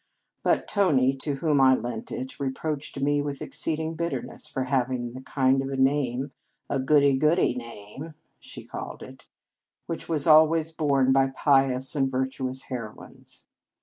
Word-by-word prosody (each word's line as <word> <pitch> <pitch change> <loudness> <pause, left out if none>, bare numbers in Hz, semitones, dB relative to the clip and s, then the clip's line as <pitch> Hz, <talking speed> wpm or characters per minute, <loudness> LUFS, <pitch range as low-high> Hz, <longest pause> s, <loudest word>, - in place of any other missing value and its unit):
But - - +1
Tony, 145 -11 +3
to 140 +1 -3
whom 145 -1 +1
I 130 0 +6
lent 120 -3 -5
it, 130 +1 -6
reproached 140 +1 -3
me 145 +1 +1
with 145 -1 -4
exceeding 160 0 -2
bitterness 170 +1 -4
for 130 - -3
hav 130 -1 0
ing 120 -2 -3
the 130 - -8
kind 135 0 +1
of 135 - -4
a 135 - -4
name 135 -1 0 0.4
a 140 - 0
goody 140 0 +4
goody 155 +4 +2
name 120 +5 -8 0.2
she - - -9
called - - -7
it - - -14 0.6
which 165 0 -6
was 155 -4 +1
always 160 +1 +5
borne 140 -4 +2
by 135 0 +4
pious 135 -1 +2
and 135 -2 +1
virtu 130 0 -2
ous 130 +1 -5
heroines. 115 -5 -9
135 Hz, 160 wpm, -26 LUFS, 130-150 Hz, 0.6 s, I